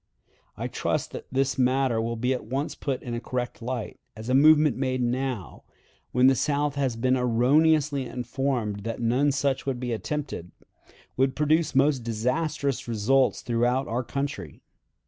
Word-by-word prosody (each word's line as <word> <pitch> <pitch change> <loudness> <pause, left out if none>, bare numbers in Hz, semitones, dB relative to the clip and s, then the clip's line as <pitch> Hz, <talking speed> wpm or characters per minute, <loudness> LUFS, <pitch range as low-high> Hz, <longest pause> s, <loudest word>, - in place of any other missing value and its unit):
I - - -3
trust - - -2
that - - -8
this 130 0 0
matter 130 -2 +2
will 115 +1 -2
be 125 +3 0
at 125 - -4
once 135 +5 -2
put 135 -3 -3
in 120 - -5
a 120 - -2
correct 125 0 -4
light, 120 -1 -4 0.2
as 110 +2 -8
a - - +2
movement 150 0 +6
made 130 -1 -1
now, 120 - -3 0.5
when 125 +1 +3
the 135 - +7
South 145 +1 0
has 135 -4 -1
been 130 +3 +2
erroneously 135 +3 +2
informed 125 -4 -2
that 115 +2 -5
none 125 +5 +2
such 140 -1 -1
would 130 -2 -1
be 120 -1 -2
attempted, 115 - -4 0.7
would 130 +1 +2
produce 155 0 +1
most 135 0 +4
disastrous 125 +5 -1
results 120 +4 +2
throughout 120 +3 +1
our 120 +3 -1
country. 125 - -5
130 Hz, 160 wpm, -26 LUFS, 120-140 Hz, 0.7 s, the